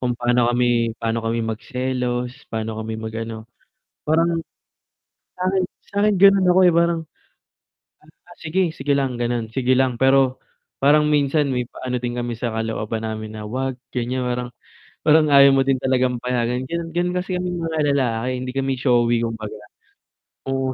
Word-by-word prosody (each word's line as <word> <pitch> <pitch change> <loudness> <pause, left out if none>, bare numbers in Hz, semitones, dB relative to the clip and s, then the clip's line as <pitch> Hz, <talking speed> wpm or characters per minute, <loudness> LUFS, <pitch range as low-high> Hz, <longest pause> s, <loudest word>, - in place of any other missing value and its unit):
kung 125 -1 0
paano 120 0 +2
kami 120 -2 +1
paano 115 0 -1
kami 115 0 -1
magselos, 125 +2 -3 0.2
paano 110 0 -3
kami 110 0 -4
mag-ano. 110 0 -6 0.6
Parang, 165 +2 +2 1.0
sa'kin 185 +1 +1 0.3
sa'kin 205 +1 +2
gano'n 195 -1 +6
ako, 180 - +4
eh, 175 - +4
parang, 170 0 +2 1.3
"Ah, 175 - -16
sige, 175 +3 0
sige 140 +1 0
lang, 135 -2 -1
gano'n. 120 -2 -1
Sige 130 0 +2
lang." 130 -2 +2
Pero, 135 -1 +4 0.4
parang 150 +2 +4
minsan 145 -1 +2
may 125 -1 -2
pa-ano 125 -1 -4
din 120 0 -4
kami 120 0 -2
sa 120 - -1
kalooban 110 0 -3
namin 110 0 -5
na, 105 - -7
"Huwag," 130 +3 -2 0.2
ganiyan, 125 +1 -2
parang 125 0 -2 0.5
parang 155 0 +5
ayaw 140 0 +8
mo 135 0 +4
din 135 -1 +2
talagang 125 -2 +1
payagan, 125 0 -1
gano'n. 170 +1 -4
Gano'n 175 +1 0
kasi 180 +1 -3
kaming 180 -1 -2
mga 165 -1 -2 0.2
lalaki, 125 -3 0
hindi 125 0 -5
kami 135 0 0
showy, 120 -2 +2
kumbaga. 110 -2 -6 0.9
Oo. 135 -1 -1
125 Hz, 155 wpm, -21 LUFS, 120-150 Hz, 1.3 s, ayaw